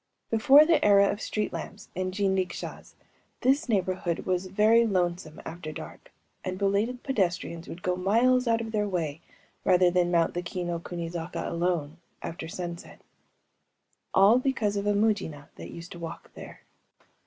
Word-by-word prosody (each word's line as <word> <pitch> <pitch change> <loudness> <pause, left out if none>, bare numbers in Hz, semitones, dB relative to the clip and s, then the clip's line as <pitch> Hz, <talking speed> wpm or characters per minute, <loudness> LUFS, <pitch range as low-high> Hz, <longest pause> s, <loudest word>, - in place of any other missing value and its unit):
Before 265 +7 +7
the 335 0 +3
era 200 -1 +6
of 205 - -5
street 210 -1 -2
lamps 200 +1 -7
and 185 0 -2
jinrikishas, 190 -2 -2 0.5
this 270 +2 +2
neighborhood 185 -4 -1
was 185 0 -1
very 215 +4 +4
lonesome 175 -6 -1
after 160 -1 -6
dark; - - -10 0.3
and 185 0 -3
belated 205 +6 0
pedestrians 180 -8 -1
would 175 - -9
go 180 0 +1
miles 235 +7 +3
out 230 0 +2
of 225 -1 -5
their 210 -2 0
way 165 -4 -2 0.4
rather 180 -1 +4
than 175 -1 +2
mount 170 -1 +2
the 175 - -2
Kii 180 +1 -4
no 170 -1 -2
kuni 170 0 -5
zaka, 170 0 -5
alone, 170 -3 -1 0.3
after 165 -1 -5
sunset. 170 0 -7 1.1
All 205 +6 +6
because 240 -6 0
of 200 0 -2
a 205 - +3
Mujina 205 -9 0
that - - -8
used 170 +1 -10
to 175 - -9
walk 165 -1 -8
there. - - -11
185 Hz, 160 wpm, -27 LUFS, 175-210 Hz, 1.1 s, Before